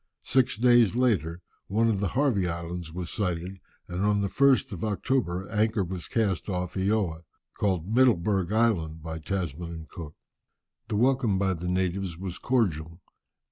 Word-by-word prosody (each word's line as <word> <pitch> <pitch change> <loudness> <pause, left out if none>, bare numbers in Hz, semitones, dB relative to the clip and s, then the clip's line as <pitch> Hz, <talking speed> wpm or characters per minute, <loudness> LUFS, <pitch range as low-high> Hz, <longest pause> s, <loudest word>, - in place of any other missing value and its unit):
Six 130 -4 +2
days 120 -2 +5
later, 90 - +1 0.3
one 110 +4 +2
of 110 -4 +1
the 100 - 0
Harvey 120 -10 +2
Islands 85 -1 -5
was 85 0 -5
sighted, 90 -1 -2 0.3
and 90 +2 -3
on 105 0 +2
the 100 - -1
1st 135 +1 +3
of 90 -4 -6
October 100 -3 -1
anchor 110 -1 +1
was 90 -1 -5
cast 105 -5 0
off 90 -1 -2
Eoa, 95 -4 0 0.3
called 95 -5 0
Middelbourg 105 -6 +2
Island 90 -9 +1
by 80 0 -5
Tasman 85 -1 -3
and 80 -1 -8
Cook. 75 -3 -9 0.7
The - - -2
welcome 125 -3 +2
by 95 0 +1
the 90 +1 -5
natives 90 -1 -1
was 90 -1 -6
cordial. 85 - 0
95 Hz, 155 wpm, -27 LUFS, 85-110 Hz, 0.7 s, days